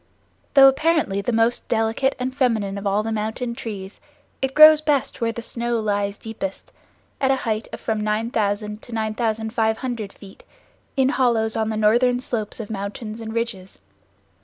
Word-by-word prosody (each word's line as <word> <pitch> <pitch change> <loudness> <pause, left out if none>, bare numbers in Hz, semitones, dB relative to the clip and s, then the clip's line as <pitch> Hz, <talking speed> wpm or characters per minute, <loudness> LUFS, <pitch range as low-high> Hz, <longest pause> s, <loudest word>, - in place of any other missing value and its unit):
Though 270 -1 +9
apparently 270 -7 +2
the 220 - -1
most 230 +1 +1
delicate 225 +4 +1
and 255 0 -3
feminine 220 -7 0
of 200 - -4
all 200 +2 +1
the 225 - -3
mountain 220 +3 -3
trees, 205 -4 -7 0.4
it 265 0 -2
grows 310 0 +9
best 290 -5 0
where 230 0 +1
the 235 0 -7
snow 235 0 -2
lies 205 -1 -1
deepest, 205 -4 -6 0.5
at 265 - +2
a 270 - +4
height 220 -1 -1
of - - -7
from 220 -2 -1
9000 210 -1 -1
to - - -13
9500 220 0 -1
feet, 195 -1 -15 0.5
in 265 -1 +4
hollows 235 -5 +1
on 220 -1 0
the 220 - -2
northern 240 +4 +3
slopes 230 -4 -3
of 220 -1 -6
mountains 215 +2 -5
and 220 -1 -6
ridges. 215 -5 -4
225 Hz, 160 wpm, -22 LUFS, 210-245 Hz, 0.5 s, Though